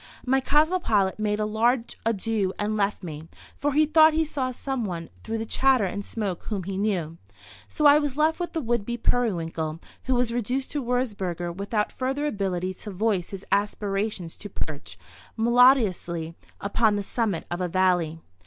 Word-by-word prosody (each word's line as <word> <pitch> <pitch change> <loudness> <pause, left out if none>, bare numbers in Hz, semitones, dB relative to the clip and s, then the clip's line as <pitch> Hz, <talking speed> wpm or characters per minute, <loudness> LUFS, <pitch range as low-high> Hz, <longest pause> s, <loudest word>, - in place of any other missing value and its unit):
My 265 +1 +3
cosmopolite 280 - +2
made 210 0 0
a 215 - +1
large 230 +3 +1
adieu 215 -3 0
and 210 +1 -1
left 205 -1 0
me, 155 -2 -7 0.3
for 290 0 -1
he 305 +2 +5
thought 315 +1 +6
he 320 0 +2
saw 275 -4 -2
some 265 0 -3
one 170 -5 -5
through 225 0 -3
the 225 - -3
chatter 260 -1 +3
and 205 +2 -3
smoke 200 -5 -4
whom 200 -4 -3
he 195 +2 -4
knew. 185 -5 -1 0.5
So 300 - -1
I 290 +1 +8
was 290 -2 -2
left 315 +2 +2
with 350 - -3
the 325 - -1
would 235 -4 0
be 240 +3 -3
periwinkle, 165 -10 -1 0.3
who 260 - +1
was 245 -1 +1
reduced 250 +3 -1
to 290 -3 -2
Würzburger 195 -9 -2
without 210 +2 -1
further 270 +3 -2
ability 185 -7 -1
to 210 - -9
voice 195 -2 0
his 195 -1 -8
aspirations 200 -3 -1
to 205 - -7
perch, 155 -5 -6 0.4
melodious, 240 -4 +4 0.5
upon 210 +1 +2
the 205 - -1
summit 205 -5 -1
of 175 +1 -2
a 180 - 0
valley. 175 -3 +1
215 Hz, 175 wpm, -25 LUFS, 190-255 Hz, 0.5 s, I